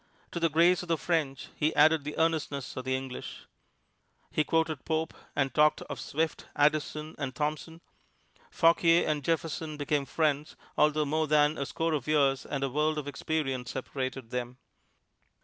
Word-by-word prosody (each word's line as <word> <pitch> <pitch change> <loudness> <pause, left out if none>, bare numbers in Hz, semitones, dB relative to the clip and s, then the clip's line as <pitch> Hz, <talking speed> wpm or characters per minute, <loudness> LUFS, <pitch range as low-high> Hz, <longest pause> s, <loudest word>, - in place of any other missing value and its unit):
To 170 - -3
the 165 0 +2
grace 170 +4 +4
of 180 - -8
the 165 -1 +1
French 145 -3 -1
he 155 +1 0
added 155 -1 +5
the 150 +1 -6
earnestness 155 -4 -1
of 130 - -5
the 130 0 +1
English. 130 -1 -6 0.9
He 155 - +2
quoted 160 -3 0
Pope, 160 0 -1 0.2
and 135 -2 0
talked 150 0 +3
of 140 - -7
Swift, 160 +2 -2
Addison 150 +1 +1
and 135 -3 -3
Thomson. 155 +2 -3 0.7
Fauquier 165 - +4
and 150 -2 0
Jefferson 160 -1 -2
became 145 -1 0
friends, 150 0 0 0.2
although 150 0 +3
more 155 +2 0
than 150 0 +4
a 140 - -3
score 165 0 -1
of 145 -3 -2
years 140 -3 +2
and 140 -1 -2
a 135 - 0
world 155 +3 +1
of 150 -2 -4
experience 135 -4 -2
separated 130 -2 -4
them. 125 0 -4
150 Hz, 165 wpm, -29 LUFS, 140-160 Hz, 0.9 s, added